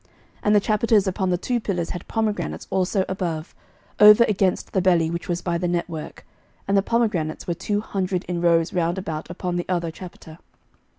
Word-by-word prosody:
11:007:020 - - -34 0.3
And 210 0 +3
the - - +7
chapiters 215 0 +2
upon 190 0 -1
the 180 - +1
two 240 +6 -1
pillars 180 -6 -2
had 180 - -7
pomegranates 220 -2 -2
also 190 +1 +1
above, 170 -4 -4 0.5
over 210 +2 +9
against 195 -4 0
the 190 - +2
belly 170 -3 +3
which 170 +2 -5
was 175 0 -2
by 170 -1 -1
the 180 - -1
network: 170 -2 -4 0.4
and 200 - +1
the 195 - +5
pomegranates 210 -8 -1
were 175 - -1
two 205 +4 -2
hundred 185 -3 -2
in 175 -1 -3
rows 170 -1 +2
round 175 0 0
about 165 -5 -5
upon 175 0 -3
the 175 - -2
other 170 -2 -1
chapiter. 165 -2 -11
180 Hz, 190 wpm, -23 LUFS, 170-200 Hz, 0.5 s, over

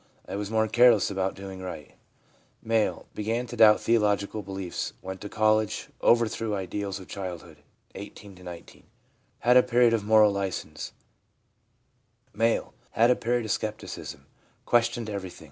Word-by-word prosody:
I - - -5
was 100 0 -4
more 110 0 +1
careless 120 -3 +5
about 95 -1 -1
doing 95 -1 -8
right/ 95 - -8 0.7
M. 115 -1 +1
' - - -37
Began 115 +3 -2
to 120 - -8
doubt 105 -1 +7
theological 105 -2 +1
beliefs. 95 -2 -5
Went 95 0 -7
to 105 - -6
college. 110 0 +1
Overthrew 115 -2 +2
ideals 100 +1 -4
of 95 - -12
child 90 -3 -6
hood 80 -3 -15 0.4
(18 100 0 -10
19). 90 -2 -11 0.6
Had 125 +1 +5
a - - +9
period 120 -1 +3
of 110 -3 0
moral 105 0 +5
license/ 100 -2 -4 1.4
M. 115 0 +2
1 - - -23 0.2
Had 115 +2 +4
a - - +4
period 120 0 -1
of 110 - -2
scepticism. 105 +1 -5 0.4
Questioned 120 -1 +1
everything. 100 -4 -6
105 Hz, 150 wpm, -27 LUFS, 95-115 Hz, 1.4 s, a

